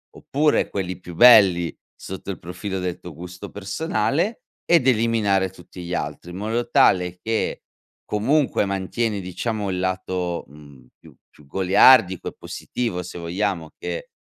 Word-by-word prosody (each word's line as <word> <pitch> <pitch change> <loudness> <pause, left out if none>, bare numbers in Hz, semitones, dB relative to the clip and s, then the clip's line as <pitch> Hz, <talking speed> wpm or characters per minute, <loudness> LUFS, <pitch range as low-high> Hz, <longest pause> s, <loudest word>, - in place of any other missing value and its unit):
oppure, 150 +2 +1
quelli 95 -2 -3
più 90 - -10
belli, 95 -6 +6 0.2
sotto 95 +1 -7
il 90 - -8
profilo 95 +3 -5
del 90 -1 -3
tuo 90 - -10
gusto 90 +5 -9
personale, 160 - -1 0.3
ed 165 -7 +4
eliminare 110 -5 +2
tutti 90 0 -12
gli 85 +1 -5
altri, 75 +4 -4
in 90 - -7
modo 115 +4 -2
tale 90 -1 +3
che, 115 0 -2 0.4
comunque, 130 +3 +1
mantieni, 100 +2 -2
diciamo, 100 +3 -3
il 90 - -2
lato, 90 -1 -2
mhmm, 70 -2 -16
più - - -17
più 75 - -21
goliardico 95 - +5
e - - -17
positivo, 110 -8 -4
se 90 - -8
vogliamo, 85 -1 -2
che, - - -5
95 Hz, 145 wpm, -22 LUFS, 90-115 Hz, 0.4 s, belli